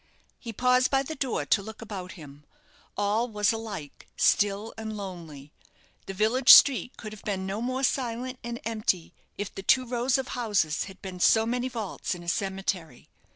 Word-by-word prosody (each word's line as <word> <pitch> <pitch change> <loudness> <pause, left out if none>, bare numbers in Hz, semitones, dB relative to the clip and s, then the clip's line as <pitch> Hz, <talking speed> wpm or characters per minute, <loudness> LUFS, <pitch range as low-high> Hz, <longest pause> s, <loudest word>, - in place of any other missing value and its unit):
He 230 - -7
paused 250 +3 +3
by 270 -1 +2
the 315 - -6
door 270 -4 -2
to 200 - +2
look 220 +1 -10
about 195 -5 -7
him. 145 -3 -13 0.5
All 210 +4 +1
was 210 -1 +1
alike 210 -10 -7
still 205 +2 +2
and 220 -1 -6
lonely. 165 -8 -8 0.6
The 195 - -6
village 230 +6 +5
street 250 -4 +7
could 215 -1 -8
have 215 - -12
been 190 -2 -3
no 195 +3 -3
more 255 +2 -2
silent 255 0 -1
and 235 0 -5
empty 215 -6 -1 0.2
if 205 -1 -5
the - - -6
two 255 +6 +3
rows 245 +2 +1
of 265 -1 -4
houses 205 -11 0
had 190 -1 -13
been 185 -2 -7
so 220 +5 +4
many 245 +2 -1
vaults 220 -6 -4
in 175 - -10
a - - -13
cemetery. 190 - -3
215 Hz, 180 wpm, -27 LUFS, 190-245 Hz, 0.6 s, street